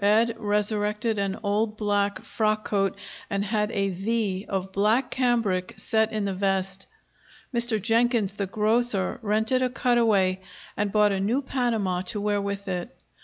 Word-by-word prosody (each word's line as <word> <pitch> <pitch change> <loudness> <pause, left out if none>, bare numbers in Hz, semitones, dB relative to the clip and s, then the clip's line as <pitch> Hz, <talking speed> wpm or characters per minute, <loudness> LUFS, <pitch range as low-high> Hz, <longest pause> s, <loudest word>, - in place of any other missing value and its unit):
Ed 225 +3 +3
resurrected 210 +1 0
an 195 0 -1
old 210 +1 0
black 205 -1 0
frock 215 -1 0
coat 195 -2 0 0.3
and 200 0 -1
had 210 0 0
a 195 -3 0
"V" 195 0 -1
of 190 -1 -2
black 215 +7 +2
cambric 230 -8 0
set 220 0 +1
in 215 -2 -1
the 195 - -1
vest. 195 0 -1 0.7
Mr. 235 -2 +1
Jenkins, 225 -1 +2
the 200 -1 -3
grocer, 215 0 +1
rented 220 +4 +1
a 255 - +2
cutaway, 225 -7 +2 0.4
and 205 -1 -1
bought 210 0 +4
a 195 - 0
new 230 +8 0
Panama 225 -9 0
to 195 +3 -4
wear 205 0 0
with 200 0 -4
it. 185 +6 -4
210 Hz, 155 wpm, -26 LUFS, 195-225 Hz, 0.7 s, bought